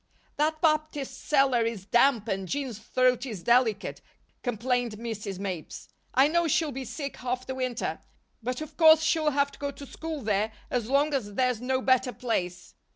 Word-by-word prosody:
"That 310 +1 +1
Baptist 305 -4 0
cellar 270 -4 +3
is 225 -4 -3
damp 240 0 +3
and 195 -2 -2
Jean's 260 -3 -3
throat 250 +2 +2
is 215 -10 -6
delicate," 235 -3 +2 0.4
complained 245 0 -1
Mrs. 215 -3 -5
Mapes. 185 -5 -6 0.3
"I 265 +2 +6
know 340 +2 +2
she'll 315 0 +1
be 265 0 -5
sick 280 +3 -5
half 250 0 -3
the 260 - -4
winter; 255 -2 -2 0.4
but 250 +4 -3
of 310 - -8
course 320 -1 +7
she'll 320 -1 +2
have 280 0 +1
to - - -16
go 285 - -2
to 280 0 -9
school 320 +1 -6
there 210 +1 0 0.2
as 240 -2 -1
long 285 +2 +2
as 205 -7 -2
there's 250 -2 +1
no 260 +1 0
better 255 -1 +3
place." 180 -7 -3
255 Hz, 175 wpm, -27 LUFS, 225-280 Hz, 0.4 s, course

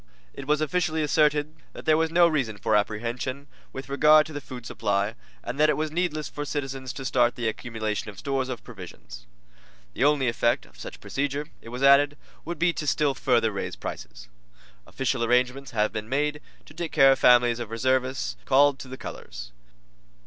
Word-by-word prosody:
It 140 - -9
was 150 0 +2
officially 160 0 0
asserted 150 0 +2 0.2
that - - -10
there 155 -1 +4
was 160 +1 +1
no 170 +1 +5
reason 130 -10 -1
for - - +1
apprehension 120 +6 -2 0.3
with 135 - -7
regard 150 +2 +5
to 155 - -10
the 145 - -5
food 125 -3 -9
supply, 100 0 -1 0.3
and 130 +4 -5
that 155 0 +5
it 150 - +1
was 155 0 -2
needless 155 -3 -1
for 145 - -6
citizens 135 -3 -4
to 135 - -7
start 120 -1 +2
the 120 -2 -2
accumulation 110 -2 -3
of 100 - -11
stores 135 -2 -2
of 125 -4 -6
provisions. - - -11 0.7
The 125 - -1
only 145 -2 +3
effect 120 0 +1
of - - -20
such - - -9
procedure, 145 +2 -3
it 115 - -11
was 125 +3 -5
added, 140 +1 +5 0.3
would 170 +1 -4
be 170 +2 +2
to 150 - -5
still 145 0 +2
further 120 -4 +1
raise 95 -9 -4
prices. - - -8 0.6
Official 130 -2 -1
arrangements 125 +3 +1
have 110 -2 0
been 110 0 -5
made 150 +2 -1 0.2
to - - -15
take 170 -2 -5
care 135 -3 +6
of 135 - +2
families 120 -1 +5
of 120 -3 -5
reservists 130 - -1
called 140 +1 +4
to - - -8
the 130 +1 -8
colors. - - -9
135 Hz, 190 wpm, -26 LUFS, 115-150 Hz, 0.7 s, care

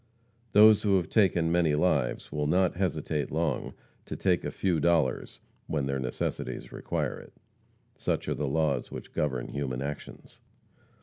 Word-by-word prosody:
Those 105 0 +7
who 100 -3 +3
have 90 - -2
taken 85 -6 +3
many 85 -3 +3
lives 75 -6 0
will 75 0 -1
not 90 +3 +2
hesitate 80 -6 -1
long 80 -3 -2 0.3
to - - -5
take 90 -4 +1
a - - -2
few 90 -4 0
dollars 80 -5 +1 0.3
when 75 -3 -1
their 70 0 -1
necessities 65 -1 -4
require - - -3
it. - - -15 0.6
Such - - -2
are - - 0
the 75 - -2
laws 75 +1 0
which - - -9
govern 65 -5 -1
human 70 -2 -3
actions. 75 0 -8
80 Hz, 150 wpm, -28 LUFS, 70-90 Hz, 0.6 s, Those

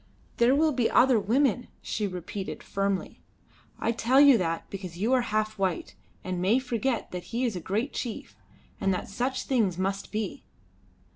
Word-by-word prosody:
"There 240 +3 +5
will 310 +2 +3
be 250 -5 +1
other 250 -3 +5
women," 245 +3 +1
she 210 -1 -2
repeated 185 +1 -6
firmly; 195 -1 -2 0.6
"I 230 - 0
tell 235 +3 +3
you 285 -2 +8
that, 165 -2 -2
because 185 -3 -7
you 220 +7 +1
are 255 - +4
half 215 -2 -1
white, 185 -4 -1 0.3
and 185 -1 -3
may 200 +7 +4
forget 250 -2 -1
that 180 -1 -6
he 240 +2 -1
is 230 -5 -1
a - - -3
great 215 - -2
chief, 235 -4 -5 0.4
and 195 - +1
that - - -5
such 250 +6 -2
things 215 -10 +1
must 195 +1 -2
be. 215 +4 -3
215 Hz, 170 wpm, -27 LUFS, 195-250 Hz, 0.6 s, you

